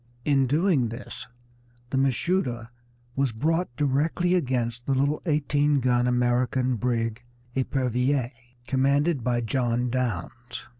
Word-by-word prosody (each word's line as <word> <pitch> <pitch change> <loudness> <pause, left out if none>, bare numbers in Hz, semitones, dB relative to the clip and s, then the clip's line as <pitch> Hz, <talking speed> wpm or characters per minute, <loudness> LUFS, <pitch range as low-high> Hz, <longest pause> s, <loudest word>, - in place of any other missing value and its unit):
In 135 -3 +3
doing 150 - +2
this 115 +2 -8 0.6
the 135 - 0
big 135 +1 +4
Mashuda 125 -5 -1 0.4
was 135 -2 +1
brought 165 +10 0
directly 150 +6 +1
against 125 -7 -1
the 135 - +2
little 140 +3 +1
eighteen 145 -1 +2
gun 125 -1 +2
American 125 +1 +1
brig 115 -1 -1 0.3
Epervier, 130 -1 0 0.3
commanded 140 +2 +1
by 120 0 +1
John 120 0 0
Downes. 120 0 -4
130 Hz, 115 wpm, -26 LUFS, 120-145 Hz, 0.6 s, big